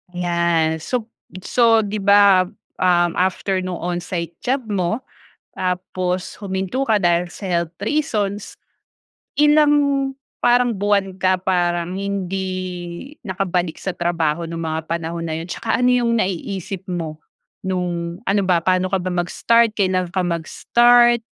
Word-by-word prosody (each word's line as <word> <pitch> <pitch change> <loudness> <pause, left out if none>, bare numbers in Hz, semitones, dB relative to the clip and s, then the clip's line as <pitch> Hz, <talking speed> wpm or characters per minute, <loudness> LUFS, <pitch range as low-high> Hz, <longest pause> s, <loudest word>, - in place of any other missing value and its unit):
Ayan, 170 -2 +1
sop 240 +8 -2 0.4
so, 230 -2 +4
'di 205 +1 -3
ba, 200 -2 +5 0.3
um, 175 -1 +3
after 190 +1 0
nung 185 -1 -4
on-site 175 -1 -3
job 265 +1 -1
mo, 195 +6 -1 0.5
tapos 180 0 -3
huminto 195 +6 -2
ka 220 - +4
dahil 175 -2 +2
sa 175 - -12
health 170 0 -1
reasons, 210 -7 -1 0.9
ilang 295 0 +5 0.6
parang 245 0 +3
buwan 200 -2 0
ka 185 -1 +1
parang 175 -1 0
hindi 185 - -4
nakabalik 180 -3 -1
sa 190 - -3
trabaho 170 -1 -1
nung 165 0 -5
mga 160 0 -3
panahon 165 0 -3
na 160 - -3
'yon? 170 - -9
Tsaka 230 +5 -1
ano 250 - +4
yung 240 -2 +2
naiisip 190 0 -4
mo, 165 -4 -4 0.5
nung 175 -1 -3
ano 200 +1 +3
ba, 180 -2 +3
paano 185 +1 +2
ka 190 - +2
ba 185 - -3
mag-start, 215 +6 +2
kailan 185 -4 0
ka 185 - +1
mag-start? 240 +8 +3
185 Hz, 130 wpm, -20 LUFS, 175-205 Hz, 0.9 s, ba